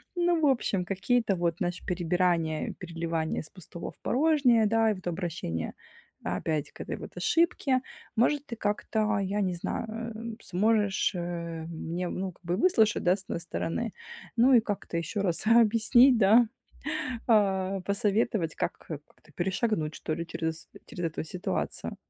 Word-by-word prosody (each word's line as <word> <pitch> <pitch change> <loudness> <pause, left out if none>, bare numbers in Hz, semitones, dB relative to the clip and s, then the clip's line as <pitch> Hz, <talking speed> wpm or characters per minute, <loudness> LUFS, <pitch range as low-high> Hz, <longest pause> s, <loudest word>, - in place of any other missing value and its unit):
Ну, 345 -1 +2
в 305 - +2
общем, 210 -8 +1
какие-то 200 +2 +1
вот, 170 -1 0
знаешь, 175 -1 -3
перебирания, 175 -2 0
переливания 165 -2 -2
с 155 - -13
пустого 175 -2 -8
в - - -28
порожнее, 260 -6 +3
да, 225 0 +3
и - - +1
вот 185 - -11
обращение 165 - -3 0.5
опять 155 -3 -2
к - - -10
этой - - -4
вот - - -10
ошибке. 290 -6 +2 0.3
Может, 280 +5 +2
ты 235 - -5
как-то, 215 0 0
я 200 +1 -1
не 185 -2 0
знаю, 170 - -3 0.3
э, 230 0 -6
сможешь, 205 +1 +2
э, 170 -2 -4
мне, 170 +2 -4
ну, 190 0 -3
как 175 - -27
бы 170 - -1
и - - -4
выслушать, 220 - +3
да, 180 +1 +4
с 195 - -11
одной 170 - -4
стороны, 185 +6 -3 0.4
ну, 250 +3 +5
и 240 - +8
как-то 205 -5 -3
еще 180 +5 -2
раз 180 0 -1
объяснить, 230 +3 +6
да, 225 +3 +6 0.8
а, 195 -4 +2
посоветовать, 200 -3 0
как - - -1
как-то 150 0 -11
перешагнуть, 185 -3 -1
что-ли, 165 +1 -3
через 160 0 -4 0.2
через 175 - -6
эту 160 0 -4
ситуацию. 180 +5 -3
190 Hz, 155 wpm, -28 LUFS, 170-225 Hz, 0.8 s, и